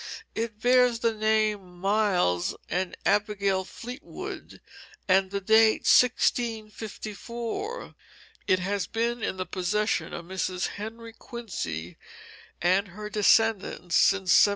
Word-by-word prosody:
It 225 -1 -4
bears 245 0 +4
the 230 -1 +2
names 215 -1 +1
Miles 180 - 0
and 180 +2 -2
Abigail 200 -2 +1
Fleetwood, 245 +9 -8 0.5
and 190 0 +3
the 200 +1 -2
date 220 +2 +4
1654. 235 - 0 0.5
It 185 - +4
has 195 +1 -2
been 235 +1 -1
in 190 - -2
the 185 - -3
possession 210 +5 -1
of 170 - -6
Mrs. 185 0 -2
Henry 225 +2 -8
Quincy 90 - -6 0.7
and 185 +3 +3
her 210 +3 -8
descendants 210 -4 +2
since 190 -2 +4
1750. - - +6
210 Hz, 110 wpm, -27 LUFS, 190-225 Hz, 0.7 s, 1750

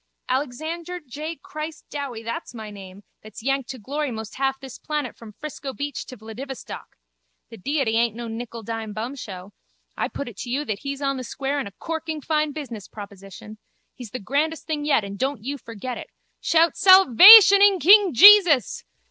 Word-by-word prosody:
Alexander 315 +7 -4
J 300 +2 -7
Christ 310 +2 -8
Dowie, 270 -6 -6
that's 230 +1 -6
my 220 -2 -8
name, 195 0 -12 0.2
that's 215 +1 -12
yanked 270 -1 -1
to 260 - -6
glory 285 +6 -4
most 220 -2 -8
half 270 0 -1
this 265 -3 -11
planet 300 -5 -4
from 225 -2 -13
Frisco 280 +1 -8
beach 285 -1 -5
to 255 - -10
Vladivostok. 235 +5 -9 0.5
The 225 - -12
Deity 260 +1 -1
aint 230 -2 +1
no 235 0 -7
nickel 230 0 -7
dime 220 -1 -6
bumshow. 215 -5 -7 0.4
I - - -2
put 280 - -7
it 230 -5 -10
to 245 - -7
you 280 +5 -2
that 210 -5 -4
He's 280 0 -6
on 275 -1 -1
the 255 - -6
square 275 +3 -3
and 270 - -4
a - - -10
corking 320 +2 -5
fine 305 0 -1
business 255 -9 -8
proposition. 200 +1 -12 0.3
He's 245 -4 -10
the 255 - -6
grandest 295 +8 -2
thing 300 -2 -4
yet 285 -7 +2
and 200 0 -8
don't 265 -4 -2
you 280 +3 -5
forget 235 +2 -7
it. - - -9 0.3
Shout 330 0 +2
salvation 390 - +8
in 405 -1 +5
King 395 +2 +6
Jesus. 360 - +6
270 Hz, 180 wpm, -23 LUFS, 225-305 Hz, 0.5 s, salvation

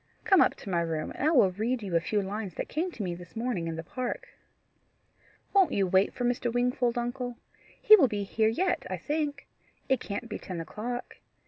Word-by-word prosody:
Come 390 -5 +5
up - - +4
to - - -9
my 170 -1 +2
room, 160 -2 -2
and 290 - -1
I - - +4
will 240 - +5
read 225 +5 -1
you 185 -4 -3
a - - +6
few 205 +4 -1
lines 200 -2 -5
that - - -3
came 335 +5 -1
to 225 - -5
me 180 -2 -2
this 175 +3 -11
morning 225 -7 -2
in 165 - -3
the 165 - -5
park." 250 +8 -4 1.2
"Won't 390 -4 +4
you 195 - +2
wait 190 +2 +3
for 245 - -3
Mr. 240 0 0
Wingfold, 245 0 +1
uncle? 245 0 -3 0.4
He 430 - +9
will 315 -11 +5
be 205 -3 -2
here 220 +2 +1
yet, 355 +10 0
I - - -2
think. 295 -1 -2 0.4
It 265 -2 +3
can't 205 +4 -5
be - - -5
ten 180 -3 -6
o'clock. 230 +9 -5
235 Hz, 215 wpm, -29 LUFS, 190-255 Hz, 1.2 s, He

